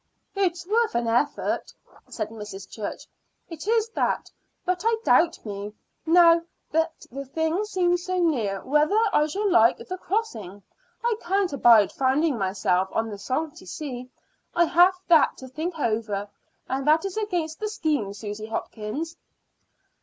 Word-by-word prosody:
"It's 355 -3 0
worth 450 - +1
an 235 0 0
effort," 245 +6 0 0.4
said 215 -2 -4
Mrs. 210 -3 -8
Church; 215 -2 -6 0.4
"it 330 +2 -8
is 450 0 +2
that. - - -1 0.3
But 365 -1 0
I 455 0 +2
doubt 335 -5 +3
me, 205 0 -6 0.3
now 335 0 +6 0.3
that 325 +1 -1
the 275 +3 -5
thing 320 +7 -1
seems 355 -3 0
so 370 0 -1
near, 230 - 0
whether 300 +9 +3
I 300 - +4
shall 405 +7 -1
like 230 - +5
the 370 0 -7
crossing. 220 - -3 0.4
I 475 -1 +2
can't 380 -1 0
abide 230 -6 +6
finding 275 +3 +1
myself 190 -2 0
on 225 0 0
the 205 - -7
salty 285 -1 -3
sea. 250 - -6 0.5
I 345 - +5
have 355 +3 +5
that 330 -3 +5
to 260 - -9
think 320 +6 -4
over, 215 -6 -1 0.4
and 270 +2 -2
that 315 +4 +4
is 390 - -4
against 350 -7 -2
the 430 - -2
scheme, 300 - -1
Susy 210 +1 -6
Hopkins." 225 +9 -4
305 Hz, 150 wpm, -25 LUFS, 225-355 Hz, 0.5 s, now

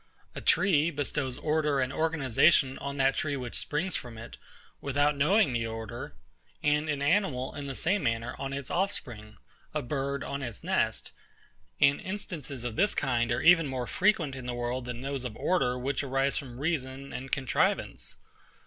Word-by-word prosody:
A - - -6
tree 165 -5 +4
bestows 145 -3 -2
order 150 -2 +1
and 130 +1 0
organisation 150 -3 +3
on 140 0 -4
that 135 -1 +3
tree 145 -2 -1
which 125 -3 -5
springs 165 +5 -1
from 120 -2 -6
it, 115 +1 -9 0.4
without 145 +1 +2
knowing 150 - +3
the 115 -1 0
order; 115 -1 -6 0.5
an 150 +1 +2
animal 145 -2 +1
in 145 -1 -6
the 135 - -4
same 185 +8 +1
manner 115 -2 -1
on 135 0 -3
its 140 -1 -5
offspring; 120 - -2 0.4
a 150 - 0
bird 140 +1 -2
on 140 - -4
its 120 -5 -6
nest; - - 0 0.7
and 140 0 +4
instances 170 - -5
of 120 -2 -4
this 210 +2 +3
kind 120 0 +1
are 120 - +1
even 165 -2 +6
more 130 -2 -3
frequent 170 - +2
in 130 -1 -7
the 120 - -2
world 120 +1 -2
than 120 -1 -5
those 135 -1 -3
of 120 -4 -5
order, 130 -9 +1
which 130 +2 -1
arise 135 0 +1
from 125 -4 -5
reason 140 -3 -2
and 135 +1 -6
contrivance. 120 - 0
140 Hz, 170 wpm, -29 LUFS, 125-150 Hz, 0.7 s, even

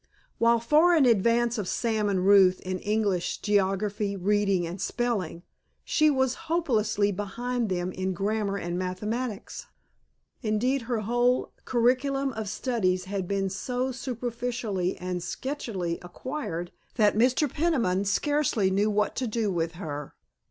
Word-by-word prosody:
While 230 0 +4
far 305 +9 +4
in 285 - +5
advance 235 +1 +3
of 200 - -3
Sam 220 -2 0
and 190 -2 0
Ruth 190 -2 +6
in 185 0 -3
English, 205 -4 0
geography, 200 0 0
reading, 195 -1 +1
and 175 +3 -6
spelling, 205 -9 -2 0.4
she 310 -1 +3
was 265 -3 +2 0.2
hopelessly 215 -11 +1
behind 230 +4 -2
them 180 0 -1
in 185 +1 -2
grammar 200 +1 -1
and 175 -1 -3
mathematics. 210 +5 -4 0.7
Indeed 245 +4 +1
her 235 -3 0
whole 240 +3 +1
curriculum 260 +3 +1
of 220 -3 -4
studies 190 -6 0
had 190 -1 -3
been 195 0 0
so 250 +6 -2
superficially 235 -6 -3
and 180 0 -3
sketchily 185 - -3
acquired 175 - -5 0.2
that 210 -3 +3
Mr. 255 +6 +3
Peniman 255 - +1
scarcely 230 -2 +1
knew 205 +3 +2
what 210 0 0
to 255 - -1
do 220 -2 -1
with 165 -1 -1
her. 150 -5 -6
210 Hz, 135 wpm, -27 LUFS, 190-245 Hz, 0.7 s, Ruth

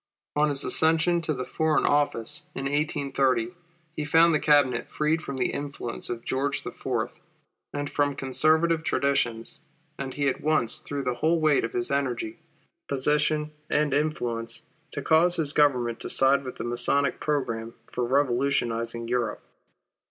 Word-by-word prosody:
On 150 +1 +3
his 140 0 -2
accession 165 +2 +3
to 155 -1 -1
the 130 0 -4
Foreign 160 -1 +1
Office 145 -6 0
in 135 - -4
1830, 140 -2 0 0.4
he 155 - -2
found 165 +3 +5
the 155 - +3
Cabinet 140 -6 +3
freed 155 +2 0
from 140 -3 -5
the 130 - 0
influence 140 -4 -5
of 120 -1 -5
George 140 +2 -1
IV., 120 -2 -3 0.5
and 145 0 -3
from 145 -1 0
Conservative 155 +5 +2
traditions; 135 -7 0 0.4
and 135 -1 -5
he 145 -1 0
at 135 - -1
once 155 -7 +2
threw 140 -1 -4
the 125 -1 0
whole 160 +7 +1
weight 155 -3 +3
of 115 - -3
his 120 +2 -1
energy, 125 -5 -2 0.5
position, 150 +2 +1 0.2
and 150 -2 +1
influence 120 -6 -2 0.3
to 145 - -4
cause 170 +4 +4
his 155 -4 -1
government 125 -6 +2
to - - -6
side 135 +1 +3
with 130 - -6
the - - -5
Masonic 120 +3 +1
programme 115 -6 -2
for 125 - -3
revolutionizing 120 -3 0
Europe. 120 -2 -1
140 Hz, 150 wpm, -26 LUFS, 125-150 Hz, 0.5 s, found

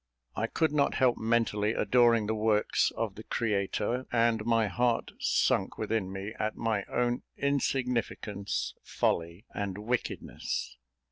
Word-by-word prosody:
I - - 0
could 160 -2 +1
not 145 -2 +2
help 130 -3 +4
mentally 110 -2 +1
adoring 120 -3 +4
the 110 - 0
works 110 -1 +2
of - - -1
the - - -10
Creator, 110 +3 -1
and 115 -2 +2
my 115 -1 +3
heart 120 +3 0
sunk - - +1
within 105 -4 -1
me 100 +3 -5
at 110 0 -1
my 110 -4 0
own 120 0 0 0.2
insignificance, 125 -7 -1
folly, 85 +6 -1
and 100 -2 -3
wickedness. 105 - -3
115 Hz, 130 wpm, -30 LUFS, 105-120 Hz, 0.2 s, help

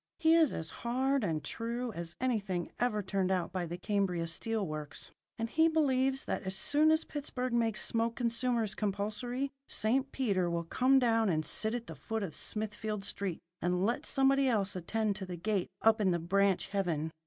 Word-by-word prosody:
He 325 -1 +4
is 325 -4 +5
as 160 0 -4
hard 260 +2 +1
and 160 -6 -1
true 235 +1 -3
as 170 -3 -6
anything 205 -8 -1
ever 215 -4 +1
turned 190 0 0
out 185 -2 0
by 180 -2 -2
the 170 +2 -5
Cambria 185 -3 0
Steel 220 +5 -2
Works; 155 -2 -6 0.3
and 225 - -2
he 320 +7 +3
believes 270 -4 +2
that - - -2
as 190 0 -3
soon 295 +10 +3
as 315 +1 +3
Pittsburgh 255 -4 -4
makes 225 -2 +2
smoke 230 0 +1
consumers 235 -3 0
compulsory, 215 +7 -2 0.2
St. 260 +5 +2
Peter 195 -9 0
will 170 0 -1
come 255 +10 +3
down 225 -4 +3
and 155 -3 0
sit 220 +8 +1
at 235 -1 -4
the - - -8
foot 225 -1 -4
of 175 -6 -4
Smithfield 215 -1 -3
Street, 195 -3 -3 0.2
and 180 +2 +1
let 235 +3 -1
somebody 275 0 +3
else 205 -5 +1
attend 210 +3 -1
to 195 - -5
the 180 -1 -5
gate 195 +1 -1
up 220 0 +5
in 195 - +3
the 175 - +2
branch 190 +3 +1
heaven. 170 -6 -1
215 Hz, 190 wpm, -32 LUFS, 185-250 Hz, 0.3 s, is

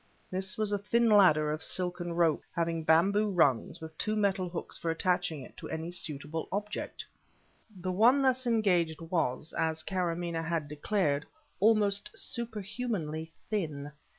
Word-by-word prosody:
This 185 0 -2
was 215 -1 0
a 205 - +1
thin 230 +3 +2
ladder 155 -8 +5
of 155 +1 -3
silken 175 -1 -1
rope, 165 -3 +2
having 165 -1 0
bamboo 195 +7 +4
rungs, 145 - +2
with 160 -1 -9
two 215 - 0
metal 195 -3 +1
hooks 170 - -6
for 165 - -3
attaching 175 -3 0
it - - -13
to - - -8
any 160 +2 -4
suitable 155 -2 -3
object. 210 +2 -4 0.7
The 185 +1 -2
one 240 +9 +5
thus 260 -1 +2
engaged 180 -9 +2
was, 160 -4 -2
as 160 0 0
Karamaneh 175 -3 -1
had 165 -2 -1
declared, 150 0 0 0.3
almost 205 -1 +3
superhumanly 210 -8 -3 0.2
thin. 150 -8 -2
175 Hz, 145 wpm, -30 LUFS, 160-205 Hz, 0.7 s, ladder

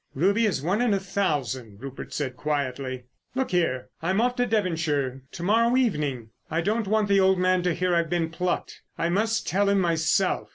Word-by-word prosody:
"Ruby 200 +10 +3
is 160 -9 -1
one 190 +8 +1
in 235 -5 +3
a - - 0
thousand," 135 - -2
Rupert 135 +1 -8
said 130 -4 -3
quietly. 130 -3 -3 0.3
"Look 265 0 -1
here, 165 -8 0
I'm 185 +5 +1
off 245 +2 +2
to 245 0 +1
Devonshire 160 - 0
to 170 - -7
morrow 230 +6 +3
evening. 150 - -1 0.2
I 165 +2 0
don't 215 +4 0
want 215 0 +2
the 200 -1 +4
old 190 0 +4
man 185 0 +2
to 175 -2 0
hear 180 0 0
I've 170 -1 +1
been 170 -2 0
plucked. 180 +2 -3 0.2
I 165 - 0
must 220 +5 0
tell 200 +4 +2
him 200 0 +3
myself. 170 +2 +1
180 Hz, 195 wpm, -25 LUFS, 145-200 Hz, 0.3 s, the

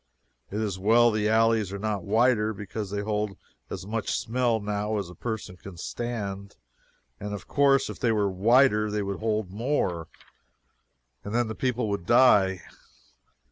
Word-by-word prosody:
It 105 - -4
is 100 -4 -2
well 115 +4 +5
the 105 0 0
alleys 110 -2 +2
are 100 - -4
not 105 -1 -2
wider, 110 +1 +2
because 105 +1 -6
they 100 +1 -2
hold 105 -1 -2 0.3
as - - -6
much 110 +1 -2
smell 120 -1 0
now 105 +1 -2
as 95 -4 -4
a - - -10
person 110 -2 -5
can 95 -1 -11
stand, 100 -1 -5 0.6
and 105 +1 -4
of 100 - -10
course, 140 -1 +3
if - - -8
they 120 -3 +2
were 105 -2 +1
wider 105 +3 +3
they 105 0 -1
would 100 0 -4
hold 110 -3 -1
more, 100 - -1 1.2
and 100 +2 -5
then 120 -2 +1
the - - -3
people 125 -1 -1
would 100 -4 -3
die. 100 -7 +5
105 Hz, 165 wpm, -26 LUFS, 100-115 Hz, 1.2 s, well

